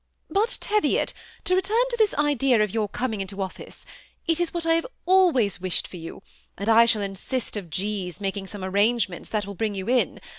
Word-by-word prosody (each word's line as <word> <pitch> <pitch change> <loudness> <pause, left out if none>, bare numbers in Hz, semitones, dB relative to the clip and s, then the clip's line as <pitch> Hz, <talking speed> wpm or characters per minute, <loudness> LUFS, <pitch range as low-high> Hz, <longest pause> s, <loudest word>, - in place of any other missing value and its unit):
" - - -49
But, 420 +4 +1
Teviot, 425 0 +1 0.3
to 365 - +1
return 405 +6 +3
to - - 0
this 435 -3 +2
idea 275 -6 +3
of 210 - -2
your 215 -2 0
coming 225 -2 -2
into 195 +1 -6
office. 190 -1 -6 0.4
It 330 0 +1
is 345 -1 0
what 340 -1 -2
I 330 - +4
have 330 0 +1 0.2
always 335 - +3
wished 185 -2 0
for 180 - -10
you; 165 +3 -9 0.3
and 200 - -4
I 230 +1 +7
shall 220 -3 +2
insist 200 +6 -3
on 195 -5 -5
G.'s 190 -1 -3
making 195 -1 -3
some 205 -1 -8
arrangement 200 0 +1
that 210 -2 -1
will 200 - -6
bring 210 +1 -2
you 190 -1 -4
in. 250 +1 +1
220 Hz, 210 wpm, -25 LUFS, 195-320 Hz, 0.4 s, I